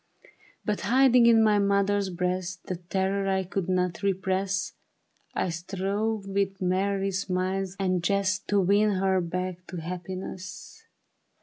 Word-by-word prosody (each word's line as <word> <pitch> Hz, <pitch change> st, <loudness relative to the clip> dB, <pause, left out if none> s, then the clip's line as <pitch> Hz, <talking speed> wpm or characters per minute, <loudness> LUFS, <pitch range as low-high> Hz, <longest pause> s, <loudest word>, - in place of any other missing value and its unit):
But 210 Hz, -1 st, -1 dB
hiding 250 Hz, -1 st, +5 dB
in 225 Hz, -1 st, +6 dB
my 210 Hz, -1 st, +4 dB
mother 200 Hz, 0 st, +2 dB
breast 180 Hz, 0 st, -2 dB
The 185 Hz, -, -3 dB
terror 190 Hz, +2 st, -1 dB
I 190 Hz, 0 st, +1 dB
could 185 Hz, 0 st, -3 dB
not 180 Hz, +1 st, 0 dB
repress, 195 Hz, 0 st, -1 dB, 0.6 s
I -, -, 0 dB
strove 195 Hz, +5 st, -2 dB
with 195 Hz, 0 st, -1 dB
merry 195 Hz, +2 st, 0 dB
smiles 190 Hz, 0 st, -2 dB
and 185 Hz, -2 st, 0 dB
jest 200 Hz, 0 st, 0 dB
To 205 Hz, -, +2 dB
win 205 Hz, +3 st, +3 dB
her 190 Hz, 0 st, +2 dB
back 180 Hz, +1 st, -4 dB
to 180 Hz, -, -7 dB
happiness. 185 Hz, -, -7 dB
190 Hz, 130 wpm, -27 LUFS, 185-200 Hz, 0.6 s, in